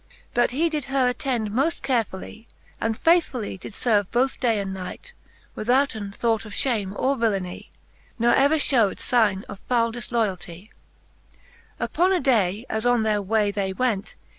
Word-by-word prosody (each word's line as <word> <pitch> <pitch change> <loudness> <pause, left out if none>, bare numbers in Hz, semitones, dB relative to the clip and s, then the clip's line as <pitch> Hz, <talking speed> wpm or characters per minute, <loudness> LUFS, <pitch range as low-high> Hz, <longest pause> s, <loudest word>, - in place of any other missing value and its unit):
But 240 0 +3
he 300 +7 +1
did 305 -4 -3
her 270 -2 +2
attend 245 -4 -2
moft 280 +9 0
carefully, 225 -3 -2 0.3
And 225 0 0
faithfully 325 - +2
did 200 - -9
ferve 205 -3 +1
both 255 +3 0
day 230 -4 +2
and 195 -1 -3
night, 190 - -8 0.4
Withouten 225 -3 0
thought 225 +1 0
of 210 -2 -10
fhame 205 -7 -1
or 275 +2 +1
villeny, 195 -6 -2 0.5
Nor 240 0 +3
ever 280 +3 +4
fhewed 245 -9 +2
figne 210 -5 +1
of 200 - -10
foule 230 -2 +2
difloyalty* 215 -6 -3
X. - - -29 1.0
Upon 360 +2 +1
a 375 - +3
day 220 - +1
as 220 0 -2
on 245 -2 +3
their 210 -1 +1
way 205 +1 +1
they 195 -2 -2
went. 220 -3 -1
230 Hz, 160 wpm, -24 LUFS, 205-255 Hz, 1.0 s, ever